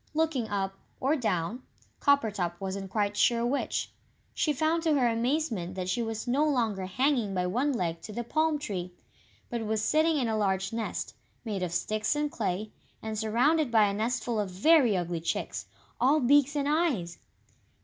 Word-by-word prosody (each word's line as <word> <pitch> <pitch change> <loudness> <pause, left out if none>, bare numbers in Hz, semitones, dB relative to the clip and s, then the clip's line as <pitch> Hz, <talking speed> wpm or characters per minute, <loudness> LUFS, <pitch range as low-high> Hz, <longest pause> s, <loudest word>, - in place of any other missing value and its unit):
Looking 310 -8 0
up, 195 -1 -2 0.2
or 275 +4 +2
down 220 - -1 0.4
Coppertop 210 - +1
wasn't 195 0 -4
quite 205 0 0
sure 235 +2 +3
which 270 +4 -1 0.4
she 310 - +1
found 315 +4 +1
to 320 -2 +2
her 255 -3 +3
amazement 230 - -1
that 185 -1 -3
she 240 - 0
was 225 0 -4
no 270 +5 +2
longer 225 -10 0
hanging 240 -1 +1
by 180 -1 0
one 250 +11 +1
leg 170 -9 -2
to 215 - -8
the 240 +3 -4
palm 310 +5 +1
tree, 185 -11 -5 0.6
but 235 -2 -2
was 215 0 0
sitting 315 +3 +3
in 255 -4 0
a 220 - 0
large 195 -1 0
nest, 225 -1 -3 0.3
made 205 -4 -3
of 180 -2 -2
sticks 215 +8 0
and 295 0 -1
clay, 210 0 -2 0.3
and 220 -1 -3
surrounded 250 +7 +2
by 225 -2 +5
a 200 -1 +2
nestful 230 +1 -1
of 205 -2 -1
very 235 - +4
ugly 175 -1 -2
chicks, 165 - -3 0.3
all 275 +5 +4
beaks 285 +2 +4
and 285 -1 0
eyes! 290 - 0
225 Hz, 175 wpm, -29 LUFS, 195-285 Hz, 0.6 s, by